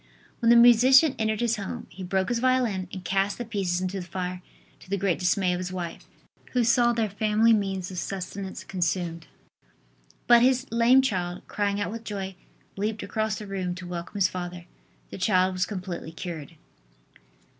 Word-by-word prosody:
When 230 Hz, -, +2 dB
the 235 Hz, -, +8 dB
musician 250 Hz, +5 st, +7 dB
entered 220 Hz, 0 st, 0 dB
his 235 Hz, -1 st, +1 dB
home, 210 Hz, +4 st, -5 dB
he 185 Hz, +3 st, -9 dB
broke 190 Hz, +1 st, 0 dB
his 240 Hz, -1 st, 0 dB
violin 240 Hz, -7 st, +1 dB
and 185 Hz, -2 st, -8 dB
cast 195 Hz, +1 st, 0 dB
the 240 Hz, -, -5 dB
pieces 190 Hz, -5 st, -1 dB
into 185 Hz, +1 st, -2 dB
the 175 Hz, -, -9 dB
fire, 180 Hz, 0 st, -4 dB, 0.4 s
to -, -, -17 dB
the 200 Hz, -, 0 dB
great 190 Hz, -2 st, 0 dB
dismay 180 Hz, 0 st, +2 dB
of 180 Hz, -, -2 dB
his 185 Hz, 0 st, -4 dB
wife, 175 Hz, -2 st, -6 dB, 0.5 s
who 250 Hz, -1 st, +3 dB
saw 240 Hz, +1 st, +4 dB
their 230 Hz, -2 st, 0 dB
family 215 Hz, +3 st, +3 dB
means 195 Hz, -3 st, -1 dB
of 180 Hz, -, -4 dB
sustenance 190 Hz, +1 st, -5 dB
consumed. 175 Hz, -2 st, -2 dB, 1.0 s
But 240 Hz, -1 st, +7 dB
his 255 Hz, +1 st, +3 dB
lame 235 Hz, +3 st, +5 dB
child, 180 Hz, -7 st, -2 dB
crying 200 Hz, -1 st, -1 dB
out 205 Hz, -, -2 dB
with 230 Hz, 0 st, -7 dB
joy, 195 Hz, -3 st, -5 dB, 0.4 s
leaped 210 Hz, +2 st, -2 dB
across 220 Hz, -2 st, -1 dB
the 215 Hz, -, -7 dB
room 185 Hz, -3 st, -3 dB
to 180 Hz, 0 st, -8 dB
welcome 175 Hz, +2 st, -6 dB
his 195 Hz, -2 st, +3 dB
father. 175 Hz, -1 st, -6 dB, 0.5 s
The -, -, -7 dB
child 185 Hz, -1 st, +2 dB
was 185 Hz, 0 st, 0 dB
completely 185 Hz, -5 st, -6 dB
cured. 165 Hz, -3 st, -7 dB
195 Hz, 180 wpm, -26 LUFS, 180-225 Hz, 1.0 s, the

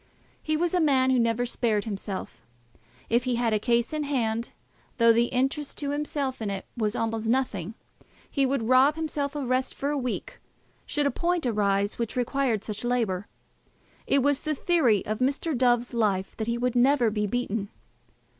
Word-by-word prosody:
He 310 Hz, -1 st, 0 dB
was 345 Hz, +2 st, 0 dB
a 360 Hz, -, +3 dB
man 265 Hz, -4 st, +3 dB
who 255 Hz, -, +3 dB
never 230 Hz, +1 st, +1 dB
spared 225 Hz, -4 st, 0 dB
himself. 200 Hz, -2 st, -5 dB, 0.7 s
If 235 Hz, +2 st, +1 dB
he 250 Hz, -1 st, +1 dB
had 235 Hz, -2 st, +1 dB
a 215 Hz, -, +2 dB
case 235 Hz, +5 st, +1 dB
in 305 Hz, -, -1 dB
hand, 235 Hz, -5 st, -1 dB, 0.5 s
though 230 Hz, -1 st, +6 dB
the 235 Hz, +1 st, +3 dB
interest 270 Hz, +4 st, -1 dB
to 285 Hz, -1 st, -2 dB
himself 285 Hz, -3 st, -2 dB
in 215 Hz, -, -2 dB
it 195 Hz, -1 st, -4 dB
was 215 Hz, -3 st, -1 dB
almost 225 Hz, 0 st, -2 dB
nothing, 225 Hz, -6 st, -1 dB, 0.5 s
he 275 Hz, -, 0 dB
would 270 Hz, -2 st, +1 dB
rob 260 Hz, +4 st, +5 dB
himself 300 Hz, -3 st, -3 dB
of 280 Hz, -4 st, -3 dB
rest 255 Hz, +1 st, 0 dB
for 280 Hz, +1 st, -2 dB
a 295 Hz, -, -1 dB
week 375 Hz, -, -4 dB, 0.5 s
should 295 Hz, -1 st, 0 dB
a 280 Hz, -, +2 dB
point 350 Hz, -3 st, -1 dB
arise 205 Hz, -3 st, +1 dB
which 235 Hz, +1 st, -3 dB
required 250 Hz, -3 st, 0 dB
such 210 Hz, 0 st, -5 dB
labour. 225 Hz, -6 st, 0 dB, 0.8 s
It 275 Hz, -2 st, +3 dB
was 285 Hz, 0 st, +2 dB
the 305 Hz, 0 st, -2 dB
theory 270 Hz, -, +2 dB
of 215 Hz, 0 st, -3 dB
Mr. 280 Hz, +4 st, 0 dB
Dove's 245 Hz, 0 st, +2 dB
life 200 Hz, -5 st, 0 dB
that 220 Hz, -, -3 dB
he 235 Hz, 0 st, 0 dB
would 250 Hz, 0 st, -1 dB
never 245 Hz, -2 st, +4 dB
be 210 Hz, -1 st, -1 dB
beaten. 220 Hz, -3 st, -2 dB
245 Hz, 185 wpm, -26 LUFS, 225-280 Hz, 0.8 s, though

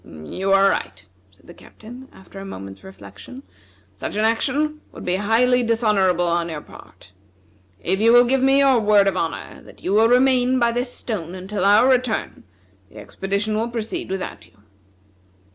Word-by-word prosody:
"You 80 Hz, -, -5 dB
are 195 Hz, 0 st, +5 dB
right," -, -, -5 dB, 0.2 s
said -, -, -28 dB
the -, -, -13 dB
Captain, 245 Hz, +4 st, -14 dB
after 190 Hz, +1 st, -14 dB
a -, -, -8 dB
moment's 95 Hz, -, -10 dB
reflection, 250 Hz, +7 st, -13 dB, 0.5 s
"such -, -, -6 dB
an 215 Hz, +1 st, +1 dB
action 290 Hz, +7 st, -1 dB
would -, -, -11 dB
be 180 Hz, +1 st, 0 dB
highly 240 Hz, +5 st, +2 dB
dishonorable 210 Hz, -7 st, +1 dB
on 170 Hz, 0 st, -1 dB
your 155 Hz, -2 st, -6 dB
part. 90 Hz, -, -17 dB, 0.7 s
If 195 Hz, -, -2 dB
you 230 Hz, +1 st, +5 dB
will 245 Hz, +1 st, +6 dB
give 260 Hz, +2 st, +1 dB
me 270 Hz, +1 st, +4 dB
your 270 Hz, -3 st, +4 dB
word 205 Hz, -2 st, +3 dB
of 195 Hz, -, 0 dB
honor 165 Hz, -3 st, -5 dB
that -, -, -17 dB
you 185 Hz, -, -2 dB
will 220 Hz, +2 st, +4 dB
remain 255 Hz, 0 st, +3 dB
by 235 Hz, -2 st, +2 dB
this 245 Hz, +1 st, -3 dB
stone 185 Hz, -9 st, -6 dB
until 190 Hz, +1 st, -4 dB
our 205 Hz, +5 st, +5 dB
return, 250 Hz, -, -1 dB, 0.4 s
the 110 Hz, -, -17 dB
expedition 200 Hz, -, -3 dB
will 225 Hz, +2 st, -1 dB
proceed 230 Hz, -4 st, -5 dB
without 190 Hz, 0 st, -6 dB
you." -, -, -28 dB
215 Hz, 175 wpm, -21 LUFS, 190-245 Hz, 0.7 s, will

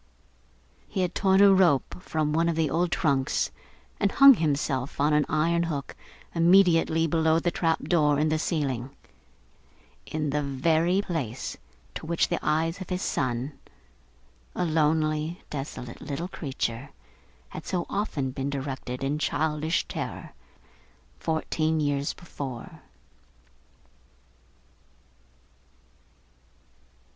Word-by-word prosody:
He 190 Hz, -, -2 dB
had 180 Hz, -1 st, -2 dB
torn 190 Hz, 0 st, +3 dB
a 200 Hz, -1 st, +8 dB
rope 180 Hz, -3 st, +2 dB
from 155 Hz, -3 st, -1 dB
one 165 Hz, +2 st, +2 dB
of 165 Hz, -, 0 dB
the 160 Hz, -3 st, 0 dB
old 175 Hz, +2 st, +1 dB
trunks, 140 Hz, -7 st, +1 dB, 0.5 s
and 200 Hz, -, +2 dB
hung 275 Hz, 0 st, +9 dB
himself 140 Hz, -, -1 dB
on 150 Hz, +2 st, +3 dB
an 150 Hz, 0 st, +3 dB
iron 165 Hz, +3 st, +2 dB
hook 150 Hz, -5 st, -3 dB, 0.4 s
immediately 165 Hz, -2 st, +4 dB
below 160 Hz, 0 st, +2 dB
the 175 Hz, +1 st, 0 dB
trap 165 Hz, -2 st, 0 dB
door 150 Hz, -4 st, +3 dB
in 155 Hz, +2 st, +2 dB
the 155 Hz, 0 st, +1 dB
ceiling 135 Hz, -7 st, -1 dB, 1.2 s
in 155 Hz, -2 st, -2 dB
the 150 Hz, +1 st, 0 dB
very 160 Hz, +7 st, +1 dB
place 135 Hz, -, -4 dB, 0.4 s
to -, -, -7 dB
which 170 Hz, 0 st, +1 dB
the 175 Hz, -, 0 dB
eyes 165 Hz, +4 st, 0 dB
of 185 Hz, -, -7 dB
his 180 Hz, 0 st, -2 dB
son, 130 Hz, +1 st, -1 dB, 1.0 s
a 180 Hz, -, 0 dB
lonely, 155 Hz, +1 st, 0 dB
desolate, 135 Hz, -4 st, -6 dB
little 150 Hz, +4 st, -4 dB
creature, 135 Hz, -6 st, -4 dB, 0.6 s
had -, -, -9 dB
so 180 Hz, -2 st, -1 dB
often 150 Hz, -10 st, -2 dB
been 135 Hz, +1 st, -3 dB
directed 135 Hz, -2 st, -4 dB
in 145 Hz, +2 st, -1 dB
childish 155 Hz, +1 st, 0 dB
terror, -, -, -6 dB, 0.9 s
fourteen 160 Hz, 0 st, 0 dB
years 145 Hz, -1 st, 0 dB
before. 135 Hz, -8 st, -8 dB
155 Hz, 115 wpm, -27 LUFS, 140-170 Hz, 1.2 s, hung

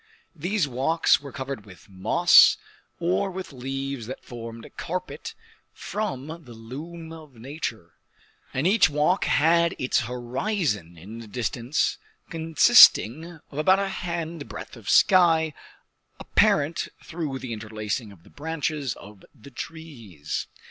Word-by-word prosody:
These 180 Hz, +2 st, 0 dB
walks 140 Hz, +7 st, +2 dB
were 140 Hz, -1 st, -9 dB
covered 130 Hz, -4 st, -6 dB
with 95 Hz, -4 st, -16 dB
moss 95 Hz, -2 st, +5 dB, 0.4 s
or 180 Hz, +3 st, 0 dB
with 185 Hz, -4 st, -7 dB
leaves 135 Hz, -1 st, -5 dB
that 130 Hz, -, -7 dB
formed 115 Hz, -1 st, -8 dB
a -, -, -13 dB
carpet 185 Hz, +2 st, -6 dB, 0.4 s
from 190 Hz, -12 st, -4 dB, 0.2 s
the 120 Hz, -2 st, -12 dB
loom 160 Hz, +9 st, -9 dB
of 155 Hz, -5 st, -13 dB
nature; 115 Hz, -, -6 dB, 0.6 s
and 130 Hz, +4 st, -2 dB
each 190 Hz, -3 st, +5 dB
walk 150 Hz, +6 st, +1 dB
had 170 Hz, +4 st, +3 dB
its 130 Hz, -, +1 dB
horizon 120 Hz, -, -2 dB
in 105 Hz, +8 st, -10 dB
the 115 Hz, -, -10 dB
distance, 120 Hz, +4 st, -1 dB, 0.3 s
consisting 165 Hz, -, +5 dB
of 145 Hz, -, -5 dB
about 185 Hz, +5 st, +5 dB
a 195 Hz, 0 st, -1 dB
hand 170 Hz, -4 st, -5 dB
breadth -, -, -8 dB
of 115 Hz, -5 st, -9 dB
sky, 165 Hz, -5 st, +5 dB, 0.7 s
apparent 150 Hz, +3 st, +2 dB, 0.2 s
through 155 Hz, -5 st, -4 dB
the 130 Hz, -3 st, -6 dB
interlacing 110 Hz, 0 st, -4 dB
of 90 Hz, -4 st, -17 dB
the -, -, -19 dB
branches 150 Hz, -3 st, -3 dB
of 105 Hz, -1 st, -14 dB
the 140 Hz, +2 st, -15 dB
trees. 120 Hz, -, -7 dB
140 Hz, 130 wpm, -25 LUFS, 115-165 Hz, 0.7 s, moss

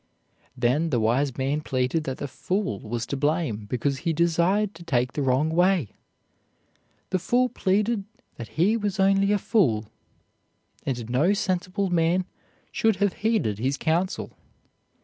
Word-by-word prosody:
Then 130 Hz, +7 st, +1 dB
the 125 Hz, -6 st, +1 dB
wise 120 Hz, +4 st, +1 dB
man 140 Hz, +3 st, 0 dB
pleaded 130 Hz, +3 st, -1 dB
that 130 Hz, -1 st, -3 dB
the 145 Hz, -, -4 dB
fool 180 Hz, -, -2 dB
was 115 Hz, +1 st, -4 dB
to 140 Hz, -, -3 dB
blame 140 Hz, -7 st, -1 dB
because 135 Hz, +4 st, -1 dB
he 165 Hz, +1 st, -1 dB
desired 170 Hz, +5 st, +2 dB
to 170 Hz, -, -12 dB
take 125 Hz, -6 st, 0 dB
the 145 Hz, -, -2 dB
wrong 135 Hz, +4 st, +2 dB
way. 175 Hz, -, +2 dB, 1.2 s
The 185 Hz, -, +1 dB
fool 250 Hz, +7 st, +2 dB
pleaded 205 Hz, +1 st, 0 dB, 0.3 s
that 115 Hz, -, -7 dB
he 195 Hz, +8 st, +4 dB
was 205 Hz, -3 st, -2 dB
only 195 Hz, +1 st, +3 dB
a 210 Hz, -, +3 dB
fool, 120 Hz, -, +1 dB, 1.0 s
and 120 Hz, -4 st, -2 dB
no 140 Hz, -, +2 dB
sensible 185 Hz, 0 st, -1 dB
man 175 Hz, +2 st, +2 dB, 0.5 s
should 220 Hz, -2 st, +2 dB
have 200 Hz, 0 st, +1 dB
heeded 205 Hz, -, +1 dB
his 135 Hz, +4 st, 0 dB
counsel. 170 Hz, +4 st, -1 dB
165 Hz, 150 wpm, -25 LUFS, 130-195 Hz, 1.2 s, he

